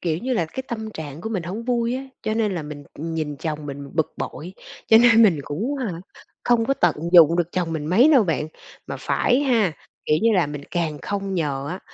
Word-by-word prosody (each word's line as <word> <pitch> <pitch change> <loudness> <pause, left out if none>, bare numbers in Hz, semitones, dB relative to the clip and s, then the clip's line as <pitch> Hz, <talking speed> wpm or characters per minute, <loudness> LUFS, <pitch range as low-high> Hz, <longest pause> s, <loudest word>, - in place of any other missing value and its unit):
Kiểu 165 -2 -1
như 255 +5 -3
là 170 -9 0
cái 260 +11 -6
tâm 220 -2 -5
trạng 155 -4 -8
của 220 - -4
mình 195 -6 -2
hổng 200 +7 -5
vui 240 -1 0
á. 265 - -5 0.2
Cho 215 - -1
nên 215 -4 0
là 165 - -3
mình, 145 -1 -8
ừm, 165 +2 -5
nhìn 150 -2 -3
chồng 150 0 -4
mình 140 0 -7
bực 160 -1 0
bội, 175 +5 -6 0.3
cho 220 - +7
nên 230 -1 +6
mình 175 -10 +4
cũng 225 - -3
hả, 200 -11 -4 0.4
không 240 -2 +3
có 275 - +1
tận - - +2 0.2
dụng 170 -1 +7
được 175 -1 -1
chồng 175 -3 -1
mình 155 -2 -3
mấy 215 - +5
đâu 260 - +6
bạn. 155 -3 -1 0.4
Mà - - -5
phải 250 +2 +1
ha, 230 - +2 0.3
kiểu 150 - +2
như 230 - +4
là, 175 -5 +3
mình 145 -1 -6
càng 165 -4 -2
không 195 -1 -3
nhờ 140 -5 -2
á 180 +3 -4
175 Hz, 235 wpm, -22 LUFS, 155-225 Hz, 0.4 s, cho